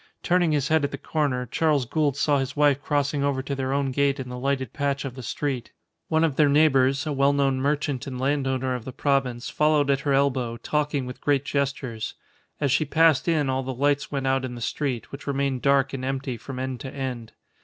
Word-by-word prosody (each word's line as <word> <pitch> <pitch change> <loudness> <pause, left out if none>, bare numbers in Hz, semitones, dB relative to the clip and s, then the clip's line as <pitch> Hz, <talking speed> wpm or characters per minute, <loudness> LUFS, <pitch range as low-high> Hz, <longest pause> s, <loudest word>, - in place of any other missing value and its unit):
Turning 175 -2 +2
his 145 -2 0
head 160 -1 +3
at 140 - +1
the - - -6
corner, 140 -5 -1
Charles 145 +2 +1
Gould 145 +1 0
saw 145 -1 +2
his 135 +1 -3
wife 145 -1 +3
crossing 145 -1 0
over 140 -2 0
to 140 - -4
their 135 -1 -2
own 140 -1 0
gate 140 +1 +1
in 130 -1 -5
the 125 0 -6
lighted 130 -2 -1
patch 140 -1 -1
of 135 - -5
the 130 - -8
street. 125 0 -3 0.4
One 160 0 +2
of 155 -5 +1
their 150 -2 +5
neighbours, 140 -2 +3
a 150 - -1
well 140 +1 +3
known 135 -2 +2
merchant 145 -2 -1
and 130 -2 -5
landowner 130 -1 0
of 125 -2 -4
the 130 - -7
province, 135 -4 0
followed 150 -2 +3
at 135 - +2
her 140 0 0
elbow, 130 -4 +1
talking 150 0 -1
with 125 0 -8
great 140 -1 +1
gestures. 135 -6 -2 0.4
As 140 -3 +1
she 155 - +3
passed 155 -1 +3
in 155 -4 +2
all 130 0 0
the 130 0 -5
lights 145 +2 +1
went 135 -2 -2
out 135 0 +1
in 125 -1 -4
the - - -7
street, 125 -1 -3
which 140 +2 -9
remained 140 -2 -1
dark 140 -1 +3
and 130 -1 -4
empty 135 -1 -2
from 130 +3 -8
end 130 -1 -3
to 135 - -7
end. 125 -5 -5
140 Hz, 225 wpm, -25 LUFS, 130-145 Hz, 0.4 s, their